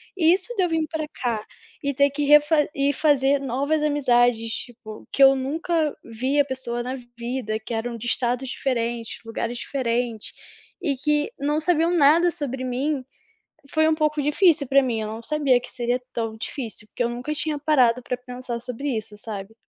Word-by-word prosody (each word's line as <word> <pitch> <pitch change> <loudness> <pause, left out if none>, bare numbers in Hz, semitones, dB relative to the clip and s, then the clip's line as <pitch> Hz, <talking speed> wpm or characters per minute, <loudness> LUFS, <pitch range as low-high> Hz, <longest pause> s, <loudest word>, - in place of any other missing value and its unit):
E 330 -3 +4
isso 385 +6 -3
de 380 - +2
eu 355 - +1
vim 320 -1 +1
para 315 -2 -3
cá, 230 -4 -3 0.4
e 280 0 0
ter 280 +2 +4
que 290 +1 -2
ref 295 +1 +6 0.2
e 280 +1 +1
fazer 280 -1 +3
novas 280 +4 0
amizades, 245 -6 +2
tipo, 220 -3 -8
que 275 - -1
eu 270 0 +8
nunca 310 +3 -1
vi 255 +6 -1
a 285 - +5
pessoa 250 -3 -4
na 255 +2 -3 0.2
vida, 235 -3 -3
que 225 +2 -7
eram 230 +1 -3
de 235 - -8
estados 250 +2 0
diferentes, 235 -4 -2
lugares 230 +1 -3
diferentes, 240 -4 -2 0.5
e 290 -6 0
que 295 +2 0
não 295 +2 0
sabiam 335 +1 +2
nada 335 +3 +5
sobre 270 -6 -4
mim, 260 +2 -1 0.7
foi 315 0 +3
um 315 - +3
pouco 305 -1 +1
difícil 295 -1 +3
para 275 +1 +5
mim, 235 -3 -1
eu 215 - -3
não 220 +2 -6
sabia 285 -3 +2
que - - -11
seria 245 0 -1
tão 225 -1 -3
difícil, 225 -2 -6
eu 240 - +3
nunca 245 +6 -4
tinha 300 0 -2
parado 255 -5 +3
para 250 - -3
pensar 250 -1 -6
sobre 250 +4 -4
isso, 215 -3 -3
sabe. 210 0 -7
265 Hz, 185 wpm, -24 LUFS, 240-295 Hz, 0.7 s, eu